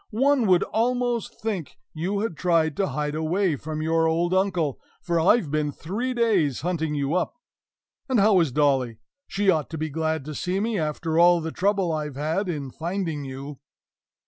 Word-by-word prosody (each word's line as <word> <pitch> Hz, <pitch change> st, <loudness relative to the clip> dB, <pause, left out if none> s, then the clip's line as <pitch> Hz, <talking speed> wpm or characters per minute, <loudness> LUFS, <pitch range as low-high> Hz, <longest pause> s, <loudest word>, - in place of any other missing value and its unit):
One 270 Hz, -2 st, +3 dB
would 180 Hz, -2 st, +4 dB
almost 240 Hz, 0 st, -1 dB
think 200 Hz, -8 st, -4 dB, 0.2 s
you 190 Hz, +6 st, -2 dB
had 220 Hz, -6 st, -2 dB
tried 165 Hz, -2 st, +1 dB
to 195 Hz, -, +1 dB
hide 150 Hz, -3 st, -2 dB
away 160 Hz, +2 st, 0 dB
from 155 Hz, +2 st, -5 dB
your 165 Hz, 0 st, +2 dB
old 170 Hz, +2 st, +1 dB
uncle, 185 Hz, -7 st, +1 dB, 0.2 s
for 170 Hz, -1 st, 0 dB
I've 170 Hz, -1 st, +3 dB
been 150 Hz, -1 st, 0 dB
three 220 Hz, -, -3 dB
days 195 Hz, -, +2 dB
hunting 160 Hz, -2 st, -1 dB
you 140 Hz, +1 st, -1 dB
up. 180 Hz, -, 0 dB, 0.7 s
And 255 Hz, -4 st, +3 dB
how 200 Hz, -1 st, +5 dB
is 165 Hz, -6 st, +2 dB
Dolly? 130 Hz, -5 st, +1 dB, 0.3 s
She 200 Hz, -1 st, +2 dB
ought 155 Hz, -4 st, -1 dB
to 160 Hz, -, -5 dB
be 155 Hz, +1 st, -2 dB
glad 160 Hz, -1 st, -1 dB
to 155 Hz, -, -6 dB
see 180 Hz, +5 st, -2 dB
me, 220 Hz, -1 st, -1 dB
after 160 Hz, +1 st, -1 dB
all 175 Hz, 0 st, +6 dB
the 160 Hz, 0 st, -4 dB
trouble 195 Hz, -2 st, +1 dB
I've 150 Hz, -3 st, -3 dB
had 160 Hz, +7 st, -1 dB
in 145 Hz, -6 st, -4 dB
finding 165 Hz, -3 st, -3 dB
you! 135 Hz, +1 st, -7 dB
165 Hz, 180 wpm, -25 LUFS, 150-195 Hz, 0.7 s, all